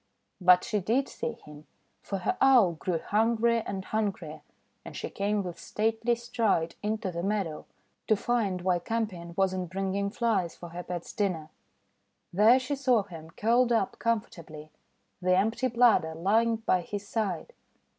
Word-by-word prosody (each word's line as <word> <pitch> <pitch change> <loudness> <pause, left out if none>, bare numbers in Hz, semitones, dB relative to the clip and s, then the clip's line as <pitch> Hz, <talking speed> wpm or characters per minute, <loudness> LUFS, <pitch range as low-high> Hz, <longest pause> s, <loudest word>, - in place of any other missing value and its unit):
But 180 0 +6
she 215 -3 -1
did 235 +8 +1
see 235 - -4
him. 150 -8 -14 0.3
For 195 - -4
her 180 - -1
Owl 255 -9 +6
grew 170 +1 -2
hungrier 230 +4 +1
and 190 -1 -4
hungrier, 190 -8 -3 0.4
and - - -9
she - - -5
came 205 +1 -1
with 175 -2 -7
stately 225 +2 0
stride 230 -8 0
into 215 -2 -2
the 170 0 -4
meadow, 195 -5 -2 0.4
to 215 - +4
find 200 -5 -1
why 180 -1 +2
Campion 180 -4 -4
was 190 -1 +2
not 185 -2 -3
bringing 195 +1 -1
Flies 200 -6 0
for 175 - -10
her 175 +2 -6
pet's 175 -1 -6
dinner. 175 -7 -1 0.8
There 215 +7 +6
she 265 +2 -2
saw 255 -5 +2
him 165 -4 -11
curled 235 +7 +2
up 225 -5 0
comfortably, 170 -10 -3 0.5
the 185 0 +3
empty 225 +6 +1
bladder 235 -10 +3
lying 220 +7 +2
by 220 -5 +1
his 205 +3 -6
side. 200 -8 -3
200 Hz, 155 wpm, -28 LUFS, 180-230 Hz, 0.8 s, But